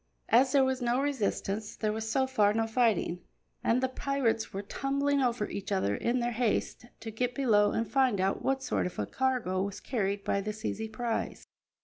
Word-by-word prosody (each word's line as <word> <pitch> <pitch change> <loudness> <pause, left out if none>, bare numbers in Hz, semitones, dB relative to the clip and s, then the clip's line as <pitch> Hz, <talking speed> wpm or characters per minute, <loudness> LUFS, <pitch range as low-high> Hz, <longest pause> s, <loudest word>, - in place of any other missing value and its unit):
As 255 +3 +5
there 275 -2 +6
was 260 -1 0
no 240 +1 +1
resistance, 220 -6 -1
there 215 -1 -1
was 220 0 -4
so 265 +4 +2
far 210 -5 +2
no 225 0 +2
fighting, 220 -6 +1 0.4
and 245 +3 +2
the - - +3
pirates 260 -4 -1
were 195 +1 -4
tumbling 280 +5 0
over 240 -4 0
each 200 0 -6
other 100 - +1
in 240 - 0
their 240 0 0
haste 240 +1 -1
to 225 - -6
get 245 +3 -2
below 210 -7 +4
and 230 +2 -1
find 260 -7 +2
out 190 +1 0
what 270 0 0
sort - - 0
of 180 - -9
a 105 - -1
cargo 245 - 0
was 200 0 -3
carried 200 -5 -2
by 200 - 0
this 215 +2 -5
easy 220 0 -2
prize. 230 +1 -3
230 Hz, 200 wpm, -30 LUFS, 205-260 Hz, 0.4 s, there